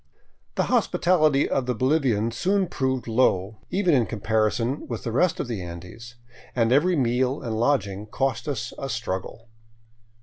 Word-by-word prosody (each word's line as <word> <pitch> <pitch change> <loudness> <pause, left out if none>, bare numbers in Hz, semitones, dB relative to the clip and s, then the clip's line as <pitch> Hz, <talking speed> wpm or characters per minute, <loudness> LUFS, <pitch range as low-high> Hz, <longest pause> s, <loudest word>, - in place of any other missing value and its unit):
The - - +2
hospitality 155 -5 +2
of 130 -2 -1
the 125 - 0
Bolivian 130 -4 +1
soon 190 - +1
proved 130 -6 -2
low, 110 -3 +1
even 185 -3 +2
in 125 -5 +3
comparison 110 +4 0
with 115 -5 -5
the 115 - -3
rest 165 +9 +2
of - - -2
the 115 -6 -4
Andes, 90 +8 -9 0.4
and 115 -2 +2
every 170 +7 +4
meal 130 0 +1
and 110 -3 -3
lodging 105 -6 0
cost 135 +4 -2
us 115 -6 -3
a 135 - -4
struggle. 115 -1 -4
120 Hz, 155 wpm, -25 LUFS, 110-140 Hz, 0.4 s, every